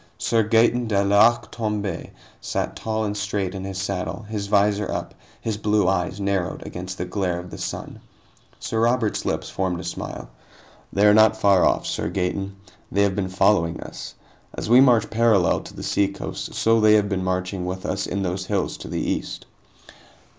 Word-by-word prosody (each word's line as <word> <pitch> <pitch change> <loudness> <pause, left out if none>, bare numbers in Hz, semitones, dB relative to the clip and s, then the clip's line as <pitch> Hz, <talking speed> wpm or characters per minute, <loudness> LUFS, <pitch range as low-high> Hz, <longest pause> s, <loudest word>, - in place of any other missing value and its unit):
Sir 115 - +2
Gaeton 115 +2 +3
de 100 -2 +2
l'Arc 100 +4 +4
Tomb├® 105 -6 -3 0.3
sat - - -3
tall 110 0 -2
and 105 0 -2
straight 100 -2 -2
in 95 -1 -5
his 95 -1 -5
saddle, 95 +3 -3
his 105 -1 -4
visor 105 0 +2
up, - - -4 0.3
his 110 -2 -3
blue 105 -2 +2
eyes 95 0 0
narrowed 95 -4 -2
against 90 +1 -6
the 90 - -3
glare 90 -1 -1
of 90 0 -8
the - - -7
sun. - - -5 0.6
Sir 110 - -2
Robert's 115 -1 +1
lips - - -2
formed 95 -2 -1
a - - -6
smile. 85 -7 -6 0.6
"They 100 +1 +3
are 105 - +7
not 110 0 +5
far 100 -3 +4
off, - - 0
Sir - - -2
Gaeton. 95 +1 -2 0.4
They 100 - +3
have 100 -2 +1
been 95 -2 -2
following 95 -3 +2
us. - - -8 0.4
As - - -4
we 120 +3 +7
march 120 -5 +5
parallel 110 -5 +3
to - - -12
the - - -7
seacoast, 100 -1 -2
so 115 0 +3
they 110 0 +6
have 105 -1 +3
been 95 -2 -2
marching 90 0 -2
with 95 +1 -5
us 95 -1 -2
in 100 - -2
those 95 +1 -3
hills 100 -3 -1
to - - -9
the - - -3
east." - - -3
100 Hz, 185 wpm, -23 LUFS, 95-110 Hz, 0.6 s, are